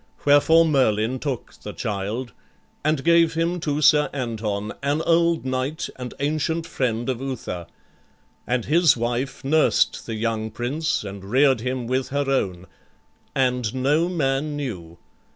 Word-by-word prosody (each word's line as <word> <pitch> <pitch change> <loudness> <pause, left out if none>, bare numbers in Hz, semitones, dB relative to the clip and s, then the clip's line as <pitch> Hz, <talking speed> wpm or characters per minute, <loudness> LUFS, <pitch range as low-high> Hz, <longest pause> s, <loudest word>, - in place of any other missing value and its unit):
Wherefore 155 +3 +6
Merlin 130 -5 +1
took 135 -4 -4
the - - -7
child, 105 +4 -3 0.5
And 155 -2 +1
gave 170 -1 +4
him 170 +2 0
to 150 -1 -1
Sir 150 +1 +5
Anton, 110 -5 -3
an 145 +3 0
old 170 -2 +2
knight 130 +5 -2
And 125 -1 -7
ancient 155 +3 -1
friend 120 -6 -2
of 130 -2 -2
Uther; 110 -10 -5 0.8
and 125 -2 0
his 165 -3 +4
wife 120 +3 -2
Nursed 155 +3 +2
the 115 - -3
young 110 0 -2
prince, 135 +9 -2
and 100 -1 -8
rear'd 130 +4 +3
him 125 0 -2
with 130 +2 -1
her 140 0 -1
own; 95 -10 -1 0.7
And 125 -3 0
no 145 +6 +2
man 145 -3 -1
knew. 90 - -6
130 Hz, 140 wpm, -23 LUFS, 115-150 Hz, 0.8 s, Wherefore